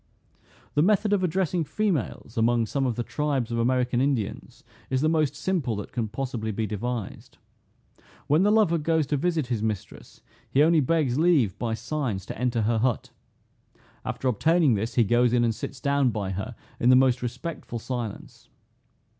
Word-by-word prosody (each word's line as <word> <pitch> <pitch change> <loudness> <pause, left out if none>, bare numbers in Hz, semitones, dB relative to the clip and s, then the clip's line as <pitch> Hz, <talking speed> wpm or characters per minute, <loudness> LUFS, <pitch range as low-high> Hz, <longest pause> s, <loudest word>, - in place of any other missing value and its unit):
The 145 - +3
method 205 +3 +3
of 195 -2 +2
addressing 180 -1 0
females, 155 - -2
among 115 0 +2
some 135 +4 -1
of 120 - -1
the 120 - -2
tribes 140 -4 -2
of 115 - -1
American 125 0 +1
Indians, 115 -6 -2 0.3
is 130 0 0
the 155 - +3
most 155 -3 +1
simple 150 - -1
that 105 - -6
can 115 -3 -2
possibly 115 -1 -4
be 110 +2 -2
devised. 110 +1 -5 0.9
When 150 +4 +3
the 205 - +4
lover 210 -6 +3
goes 160 0 +1
to 145 - -1
visit 165 -1 0
his 120 -3 -2
mistress, 110 -3 -5 0.3
he 140 - +4
only 165 +1 +4
begs 145 -2 +1
leave, 150 - +3
by 115 -2 -1
signs, 120 -5 -3
to - - -7
enter 120 -2 0
her 115 +1 +1
hut. 120 0 -1 0.9
After 130 - -3
obtaining 155 - +3
this, 110 +2 -2
he 120 - +5
goes 120 +2 +3
in, 120 -1 +3
and 115 -1 +2
sits 130 +4 -7
down 140 -1 +2
by 105 -4 -3
her 95 +1 -5 0.2
in 120 - +3
the 130 - +7
most 130 -1 +4
respectful 125 +1 -5
silence. 115 -2 -6
125 Hz, 175 wpm, -26 LUFS, 115-155 Hz, 0.9 s, the